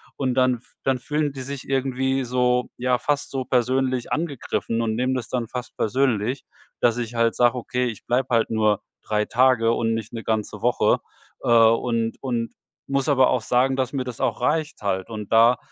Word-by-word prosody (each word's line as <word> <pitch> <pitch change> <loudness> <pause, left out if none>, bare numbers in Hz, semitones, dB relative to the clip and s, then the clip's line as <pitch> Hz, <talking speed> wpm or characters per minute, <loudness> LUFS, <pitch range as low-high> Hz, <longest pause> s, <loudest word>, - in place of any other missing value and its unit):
Und 130 -2 -1
dann 130 -1 +3
f 120 - -17
dann 135 -1 +1
fühlen 150 +2 -1
die 135 - -7
sich 140 +1 -6
irgendwie 135 0 0
so 125 0 +1
ja, 125 0 +1
fast 145 +3 -1
so 135 -1 -2
persönlich 130 0 0
angegriffen 140 -7 -2
und 110 -1 -1
nehmen 125 +3 0
das 120 -3 -3
dann 120 -3 -2
fast 125 +1 -7
persönlich, 125 0 0 0.3
dass 120 -1 +2
ich 120 -1 -4
halt 115 0 +2
sage: 120 0 +3
„Okay, 125 +1 -1
ich 110 -4 -7
bleibe 125 +2 0
halt 115 -2 +2
nur 110 -2 +1 0.2
3 105 0 0
Tage 125 -2 +3
und 115 -1 0
nicht 115 0 -4
'ne 115 -1 -5
ganze 110 -2 -2
Woche.“ - - +2 0.4
Äh, - - -1
und 115 0 +3
und 120 -3 -2 0.3
muss 135 -1 0
aber 130 -2 +4
auch 125 - +1
sagen, 125 +3 +2
dass 130 0 -1
mir 135 - -1
das 125 -2 -7
auch - - -1
reicht 155 -3 0
halt. 95 0 -2
Und 105 -2 -7
da 115 +2 +6
125 Hz, 195 wpm, -23 LUFS, 115-130 Hz, 0.4 s, da